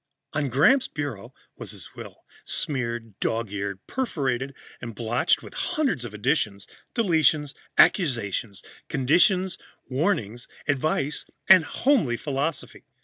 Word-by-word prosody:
On 145 Hz, -2 st, 0 dB
Gramps' 230 Hz, -, +4 dB
bureau 145 Hz, -9 st, -5 dB, 0.3 s
was -, -, -7 dB
his -, -, -10 dB
will, -, -, -11 dB, 0.2 s
smeared, 120 Hz, -6 st, -3 dB
dog 115 Hz, -2 st, -1 dB
eared, 100 Hz, -1 st, -4 dB
perforated 140 Hz, -, -2 dB, 0.3 s
and 115 Hz, -2 st, -7 dB
blotched 115 Hz, +2 st, +1 dB
with -, -, -11 dB
hundreds 265 Hz, -, -1 dB
of 120 Hz, -, -6 dB
additions, 105 Hz, -3 st, 0 dB, 0.3 s
deletions, 160 Hz, -, +2 dB, 0.2 s
accusations, 115 Hz, -, +2 dB, 0.3 s
conditions, 180 Hz, +7 st, +3 dB, 0.3 s
warnings, 125 Hz, -, -1 dB, 0.2 s
advice 145 Hz, 0 st, 0 dB, 0.2 s
and 185 Hz, -4 st, +8 dB
homely 225 Hz, -, +2 dB
philosophy. 145 Hz, +3 st, -3 dB
135 Hz, 110 wpm, -25 LUFS, 115-160 Hz, 0.3 s, and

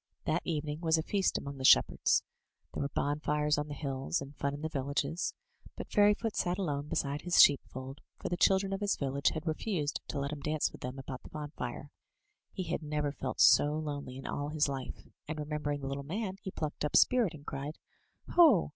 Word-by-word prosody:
That -, -, +1 dB
evening 150 Hz, -1 st, -3 dB
was 165 Hz, -1 st, +3 dB
a 160 Hz, -, -1 dB
feast 195 Hz, +1 st, +1 dB
among 140 Hz, -1 st, -6 dB
the -, -, -5 dB
shep 60 Hz, -, +8 dB
herds. -, -, +1 dB, 0.5 s
There -, -, -3 dB
were 140 Hz, -, -1 dB
bonfires 150 Hz, +1 st, 0 dB
on 150 Hz, -, -3 dB
the 145 Hz, -, -6 dB
hills, 135 Hz, -2 st, -2 dB
and 140 Hz, +1 st, -9 dB
fun 140 Hz, 0 st, -2 dB
in 145 Hz, -, -9 dB
the -, -, 0 dB
villages. 140 Hz, +3 st, -2 dB, 0.4 s
But -, -, -7 dB
Fairyfoot 210 Hz, +2 st, +3 dB
sat 175 Hz, 0 st, 0 dB
alone 145 Hz, -7 st, -2 dB
beside 145 Hz, 0 st, -1 dB
his 175 Hz, 0 st, +2 dB
sheepfold, 135 Hz, -1 st, +4 dB, 0.2 s
for -, -, -5 dB
the 175 Hz, -, 0 dB
children 195 Hz, +2 st, +3 dB
of 195 Hz, -, -3 dB
his 205 Hz, -1 st, +1 dB
village 140 Hz, 0 st, +1 dB
had 160 Hz, 0 st, -4 dB
refused 155 Hz, -2 st, -1 dB
to 145 Hz, -, -3 dB
let 140 Hz, +1 st, -2 dB
him 150 Hz, -, -5 dB
dance 150 Hz, +1 st, 0 dB
with -, -, -13 dB
them 125 Hz, +2 st, -5 dB
about 130 Hz, -1 st, -7 dB
the -, -, -12 dB
bonfire. 145 Hz, -3 st, -6 dB, 0.6 s
He 185 Hz, -, -4 dB
had 170 Hz, 0 st, -2 dB
never 150 Hz, -1 st, -1 dB
felt 130 Hz, -2 st, -5 dB
so 145 Hz, +1 st, +6 dB
lonely 145 Hz, -4 st, -4 dB
in 135 Hz, -, -9 dB
all 145 Hz, 0 st, -3 dB
his 150 Hz, -1 st, +2 dB
life, 135 Hz, -2 st, -5 dB, 0.2 s
and 155 Hz, +1 st, -4 dB
remember 150 Hz, 0 st, -3 dB
ing 145 Hz, 0 st, -2 dB
the 135 Hz, -, -4 dB
little 140 Hz, +1 st, -3 dB
man, 190 Hz, +6 st, -4 dB
he -, -, -5 dB
plucked 155 Hz, -5 st, -4 dB
up 150 Hz, -, -1 dB
spirit, 240 Hz, -10 st, +4 dB
and 145 Hz, -1 st, -13 dB
cried: 140 Hz, +2 st, -5 dB, 0.5 s
"Ho! 305 Hz, -, +6 dB
150 Hz, 215 wpm, -32 LUFS, 140-165 Hz, 0.6 s, shep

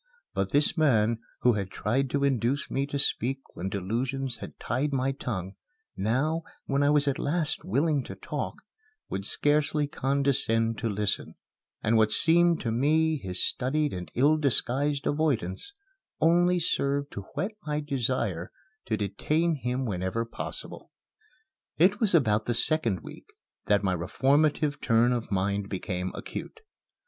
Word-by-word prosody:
But -, -, -1 dB
this 145 Hz, +1 st, +3 dB
man, 115 Hz, -8 st, +3 dB, 0.2 s
who 125 Hz, -, +4 dB
had 100 Hz, -3 st, -3 dB
tried 130 Hz, +8 st, -1 dB
to 140 Hz, +2 st, 0 dB
induce 135 Hz, 0 st, 0 dB
me 135 Hz, +1 st, 0 dB
to 145 Hz, -, -3 dB
speak 135 Hz, -1 st, +2 dB, 0.2 s
when 90 Hz, +3 st, -4 dB
delusions 120 Hz, +7 st, -2 dB
had -, -, -10 dB
tied 135 Hz, +5 st, -1 dB
my 135 Hz, 0 st, +1 dB
tongue, 100 Hz, -8 st, -4 dB, 0.4 s
now, 135 Hz, +11 st, 0 dB, 0.2 s
when 140 Hz, 0 st, 0 dB
I 145 Hz, -, +4 dB
was 145 Hz, -1 st, +4 dB
at 140 Hz, -, 0 dB
last 155 Hz, +1 st, -1 dB
willing 140 Hz, -, +1 dB
talk, -, -, -5 dB, 0.5 s
would 95 Hz, +1 st, -4 dB
scarcely 150 Hz, 0 st, +1 dB
condescend 135 Hz, -5 st, +1 dB
to 115 Hz, -, -1 dB
listen; 105 Hz, -1 st, -1 dB, 0.5 s
and 110 Hz, +1 st, +3 dB
what 110 Hz, -1 st, +3 dB
seemed 170 Hz, 0 st, +4 dB
to 115 Hz, -, -2 dB
me 155 Hz, +6 st, +2 dB
his 95 Hz, -7 st, 0 dB
studied 145 Hz, +3 st, 0 dB
and 90 Hz, -1 st, -6 dB
ill 145 Hz, +5 st, +4 dB
disguised 140 Hz, 0 st, +1 dB
avoidance 145 Hz, -, -1 dB, 0.5 s
only 175 Hz, +2 st, +4 dB
served 140 Hz, -3 st, 0 dB
to 100 Hz, -, -7 dB
whet 195 Hz, -, -1 dB, 0.2 s
my 150 Hz, 0 st, 0 dB
desire 125 Hz, -, -1 dB, 0.3 s
to 110 Hz, -, -1 dB
detain 155 Hz, -, 0 dB
him 130 Hz, -2 st, -2 dB
whenever 95 Hz, +2 st, -2 dB
possible. 115 Hz, -, -7 dB, 0.9 s
It 190 Hz, +6 st, +4 dB
was 210 Hz, -6 st, +3 dB
about 110 Hz, -8 st, +3 dB
the 120 Hz, -, 0 dB
second 115 Hz, -, +2 dB
week -, -, -11 dB, 0.4 s
that 105 Hz, 0 st, +3 dB
my 95 Hz, -2 st, +1 dB
reformative 145 Hz, -, +1 dB
turn 115 Hz, +1 st, +3 dB
of 120 Hz, -3 st, -4 dB
mind 100 Hz, +1 st, -1 dB
became 90 Hz, -1 st, -3 dB
acute. 450 Hz, -, -7 dB
130 Hz, 145 wpm, -27 LUFS, 110-150 Hz, 0.9 s, who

